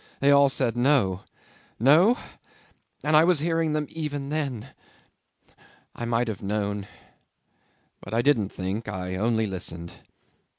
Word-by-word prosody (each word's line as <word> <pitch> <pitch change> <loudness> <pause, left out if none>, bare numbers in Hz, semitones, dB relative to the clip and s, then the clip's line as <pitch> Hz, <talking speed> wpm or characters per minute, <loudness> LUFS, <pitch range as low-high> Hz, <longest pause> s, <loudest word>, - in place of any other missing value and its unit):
They 140 +1 +4
all 140 0 +6
said 125 -3 -1
No. 120 -8 +2 0.5
No? 165 - +5 0.9
And 150 +1 +2
I 155 - +7
was 175 0 +3
hearing 165 0 0
them 150 -1 -1
even 145 -3 -4
then! 135 -6 -3 1.2
I 120 - -5
might 120 +1 0
have 110 -4 -5
known 100 0 -2 1.1
but 95 - -10
I 115 +2 +1
didn't 115 -9 +2
think 100 +5 -4
I 95 -3 -4
only 110 +3 +1
listened. 85 -3 -5
120 Hz, 130 wpm, -25 LUFS, 100-150 Hz, 1.2 s, I